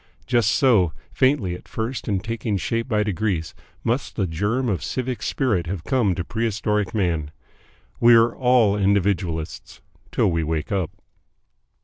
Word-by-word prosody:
Just 120 -4 +2
so, 110 - +3 0.2
faintly 130 -9 +2
at 90 - -10
first 115 +3 -4
and 100 -4 -1
taking 110 -2 -2
shape 115 +7 -2
by 105 -4 +1
degrees, 100 -4 -2 0.3
must 120 +4 -1
the 100 - 0
germ 105 +10 -1
of 100 -6 -1
civic 130 -1 -3
spirit 105 - 0
have 90 -2 -4
come 110 -7 +1
to 85 - -2
Prehistoric 105 0 -1
Man. 85 -7 0 0.7
We 120 0 +7
are 115 +1 +4
all 125 -5 +3
individualists 95 -5 -1 0.3
till 110 -6 +2
we 85 -1 0
wake 80 +2 -2
up. 95 -6 0
105 Hz, 145 wpm, -23 LUFS, 90-115 Hz, 0.7 s, We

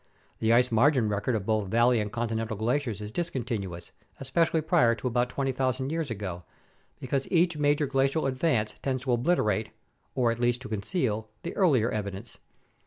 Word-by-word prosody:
The 110 - +2
ice 125 +1 +4
margin 120 0 +3
record 105 +4 -1
of 100 -3 -2
both 110 -2 0
valley 120 +3 +3
and 105 -1 -3
continental 115 -1 -2
glaciers 115 -1 -1
is 105 0 -6
discontinuous, 115 - -4 0.3
especially 160 +4 +1
prior 120 -6 +3
to 125 - -4
about 120 0 +1
20,000 130 0 -1
years 160 -3 -2
ago, 95 -6 -5 0.6
because 135 +1 -2
each 175 -1 +3
major 145 0 +2
glacial 135 +3 +1
advance 130 -5 0
tends 130 -2 -2
to 130 - -1
obliterate 115 - +1 0.5
(or 120 -2 +2
at 115 - -4
least 120 +1 +1
to 130 - -8
conceal) 110 - -2
the 170 - -5
earlier 135 - +3
evidence. 100 +1 -5
120 Hz, 165 wpm, -28 LUFS, 110-135 Hz, 0.6 s, ice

